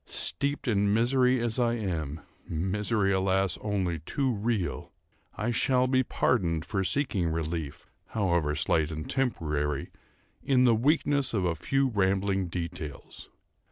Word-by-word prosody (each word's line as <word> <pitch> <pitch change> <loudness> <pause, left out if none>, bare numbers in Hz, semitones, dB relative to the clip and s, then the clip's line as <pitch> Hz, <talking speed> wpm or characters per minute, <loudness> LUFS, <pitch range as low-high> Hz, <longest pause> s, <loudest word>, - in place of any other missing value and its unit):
Steeped 140 - 0
in 100 -3 +2
misery 125 +2 +3
as 115 0 0
I 120 -1 +2
am—misery, 95 +3 -2
alas! 95 -1 +1
only 95 -6 -1
too 130 - -1
real—I 110 +1 -4
shall 125 +1 +2
be 130 0 +3
pardoned 85 -10 0
for 95 -3 -1
seeking 100 - 0
relief, 80 -2 -4 0.2
however 85 -8 0
slight 75 +1 +1
and 80 -1 -5
temporary, 75 - -1 0.5
in 130 -2 +3
the 120 -2 +5
weakness 140 +1 +2
of 95 -3 +1
a 85 - +1
few 135 - 0
rambling 95 -2 +1
details. 85 -4 -7
100 Hz, 125 wpm, -28 LUFS, 85-120 Hz, 0.5 s, the